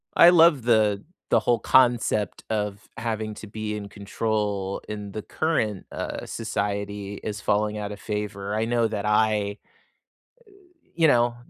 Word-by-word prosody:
I 170 Hz, -, +9 dB
love 165 Hz, -6 st, +6 dB
the 110 Hz, -4 st, +3 dB, 0.3 s
the -, -, +5 dB
whole 120 Hz, -1 st, +1 dB
concept 120 Hz, -5 st, +2 dB
of 105 Hz, -1 st, -3 dB
having 110 Hz, -2 st, -3 dB
to 110 Hz, -, -9 dB
be 105 Hz, 0 st, -4 dB
in 100 Hz, -1 st, -6 dB
control 105 Hz, -1 st, -2 dB
in 105 Hz, -2 st, -6 dB
the 110 Hz, -, -4 dB
current, 110 Hz, -, -1 dB
uh, -, -, -5 dB
society 100 Hz, -2 st, -3 dB
is 105 Hz, -1 st, -4 dB
falling 105 Hz, +1 st, 0 dB
out 105 Hz, -1 st, -4 dB
of 100 Hz, -, -11 dB
favor. 105 Hz, -1 st, -4 dB
I 110 Hz, +1 st, 0 dB
know 120 Hz, 0 st, +1 dB
that 105 Hz, -2 st, -3 dB
I 105 Hz, -1 st, +2 dB, 1.1 s
uh, -, -, -25 dB, 0.3 s
you 165 Hz, -1 st, +5 dB
know, 120 Hz, -2 st, +3 dB
105 Hz, 150 wpm, -25 LUFS, 100-115 Hz, 1.1 s, I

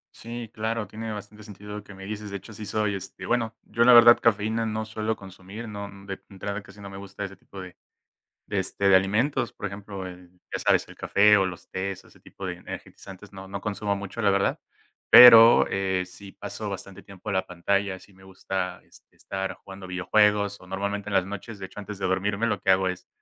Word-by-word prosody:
Sí, 115 Hz, 0 st, -7 dB
claro, 110 Hz, 0 st, -2 dB
tiene 110 Hz, +2 st, -6 dB
bastante 105 Hz, 0 st, -9 dB
sentido 105 Hz, 0 st, -10 dB
lo 105 Hz, -, -7 dB
que 100 Hz, -, -13 dB
me 95 Hz, 0 st, -10 dB
dices. 105 Hz, 0 st, -6 dB
De 100 Hz, -, -3 dB
hecho, 110 Hz, -, -13 dB
sí 105 Hz, +1 st, -8 dB
soy, 105 Hz, 0 st, -1 dB
este, 95 Hz, 0 st, -8 dB
bueno, 115 Hz, -2 st, 0 dB
yo 115 Hz, -, +1 dB
la 125 Hz, +1 st, +8 dB
verdad, 120 Hz, 0 st, +9 dB
cafeína 110 Hz, +1 st, +1 dB
no 110 Hz, 0 st, -2 dB
suelo 110 Hz, 0 st, -2 dB
consumir, 95 Hz, +4 st, -10 dB
no 100 Hz, -1 st, -6 dB, 0.2 s
de 100 Hz, -1 st, -6 dB
entrada 100 Hz, +1 st, -5 dB
casi 100 Hz, +1 st, -15 dB
no 100 Hz, -, -8 dB
me 95 Hz, -, -9 dB
gusta 100 Hz, 0 st, -8 dB
ese 100 Hz, -1 st, -6 dB
tipo 100 Hz, +1 st, -13 dB
de 90 Hz, -1 st, -10 dB, 0.7 s
de 100 Hz, -, -1 dB
este, 100 Hz, +1 st, 0 dB
de 95 Hz, -, +7 dB
alimentos, 110 Hz, +8 st, +1 dB
por -, -, -6 dB
ejemplo, 100 Hz, -1 st, -7 dB
eh, 90 Hz, 0 st, -12 dB, 0.2 s
ya -, -, -3 dB
sabes, -, -, +2 dB
el -, -, -13 dB
café 105 Hz, +1 st, +5 dB
o 95 Hz, -, +3 dB
los 90 Hz, -2 st, -6 dB
tés 95 Hz, 0 st, -4 dB
o -, -, -19 dB
ese -, -, -21 dB
tipo -, -, -9 dB
de -, -, -3 dB
energizantes 95 Hz, +1 st, -10 dB
no 95 Hz, -1 st, -10 dB
no 100 Hz, +1 st, -6 dB
consumo 105 Hz, 0 st, -2 dB
mucho, 100 Hz, +3 st, -6 dB
la 100 Hz, -, +4 dB
verdad, 100 Hz, 0 st, +1 dB, 0.5 s
pero, 115 Hz, -1 st, +10 dB
eh, 95 Hz, -1 st, -1 dB
sí 95 Hz, +1 st, -12 dB
paso 100 Hz, +1 st, -6 dB
bastante 100 Hz, 0 st, -8 dB
tiempo 100 Hz, 0 st, -12 dB
en 100 Hz, -, -1 dB
la 95 Hz, -, 0 dB
pantalla, 95 Hz, +2 st, -1 dB
sí 100 Hz, -, -19 dB
me 95 Hz, 0 st, -18 dB
gusta 95 Hz, -1 st, -4 dB
es -, -, -20 dB
estar 95 Hz, 0 st, -5 dB
jugando 95 Hz, 0 st, -10 dB
videojuegos 100 Hz, +2 st, +2 dB
o -, -, -14 dB
normalmente 100 Hz, +2 st, -3 dB
en -, -, -3 dB
las 95 Hz, -2 st, +3 dB
noches, 100 Hz, +2 st, -7 dB
de 95 Hz, -, -6 dB
hecho, 95 Hz, -, -14 dB
antes 105 Hz, -1 st, -7 dB
de 95 Hz, -, -1 dB
dormirme, 100 Hz, +4 st, 0 dB
lo 115 Hz, -, 0 dB
que 95 Hz, -, +2 dB
hago 95 Hz, 0 st, +4 dB
es 90 Hz, -1 st, -6 dB
100 Hz, 225 wpm, -26 LUFS, 95-105 Hz, 0.7 s, pero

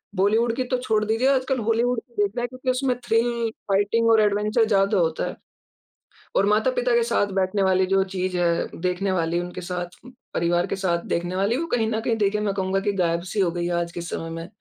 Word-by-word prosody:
बॉलीवुड 220 Hz, +5 st, +2 dB
की 255 Hz, -, -1 dB
तो 255 Hz, 0 st, -1 dB
छोड़ 215 Hz, -3 st, +1 dB
दीजिए 225 Hz, +5 st, +1 dB
आजकल 260 Hz, 0 st, 0 dB
हॉलीवुड 230 Hz, +2 st, +1 dB
की 240 Hz, -, -31 dB
देख 200 Hz, -, 0 dB
रहे 240 Hz, -, -1 dB
हैं 245 Hz, -, -1 dB
क्योंकि 255 Hz, 0 st, -5 dB
उसमें 255 Hz, 0 st, 0 dB
थ्रिल, 235 Hz, 0 st, +1 dB, 0.2 s
फाइटिंग 215 Hz, +4 st, +2 dB
और 220 Hz, -1 st, +5 dB
एडवेंचर 210 Hz, +2 st, +2 dB
ज़्यादा 200 Hz, -1 st, +2 dB
होता 160 Hz, -2 st, 0 dB
है। -, -, -6 dB, 1.0 s
और 200 Hz, -, +4 dB
माता-पिता -, -, +2 dB
के 475 Hz, -, +3 dB
साथ 205 Hz, -, +1 dB
बैठने 190 Hz, +1 st, +1 dB
वाली 190 Hz, 0 st, +3 dB
जो 195 Hz, 0 st, +3 dB
चीज़ 185 Hz, 0 st, -1 dB
है, 170 Hz, -1 st, +1 dB
देखने 185 Hz, +2 st, 0 dB
वाली 170 Hz, -1 st, 0 dB
उनके 180 Hz, +1 st, -6 dB
साथ, 180 Hz, 0 st, -5 dB, 0.4 s
परिवार 175 Hz, +2 st, +1 dB
के -, -, -2 dB
साथ 175 Hz, -3 st, -1 dB
देखने 175 Hz, +2 st, -2 dB
वाली 205 Hz, +6 st, +1 dB
वो 335 Hz, +2 st, -2 dB
कहीं 225 Hz, -2 st, +1 dB
न 220 Hz, -, 0 dB
कहीं 230 Hz, 0 st, 0 dB
देखें 210 Hz, 0 st, +1 dB
मैं 205 Hz, -2 st, 0 dB
कहूँगा 190 Hz, 0 st, 0 dB
कि -, -, +4 dB
गायब-सी 170 Hz, +4 st, -1 dB
हो 175 Hz, -3 st, +2 dB
गयी 175 Hz, 0 st, -2 dB
है 175 Hz, -, -1 dB
आज 170 Hz, 0 st, -4 dB
के 175 Hz, -, -6 dB
समय 165 Hz, -1 st, -5 dB
में। 165 Hz, +1 st, -6 dB
200 Hz, 220 wpm, -24 LUFS, 180-230 Hz, 1.0 s, और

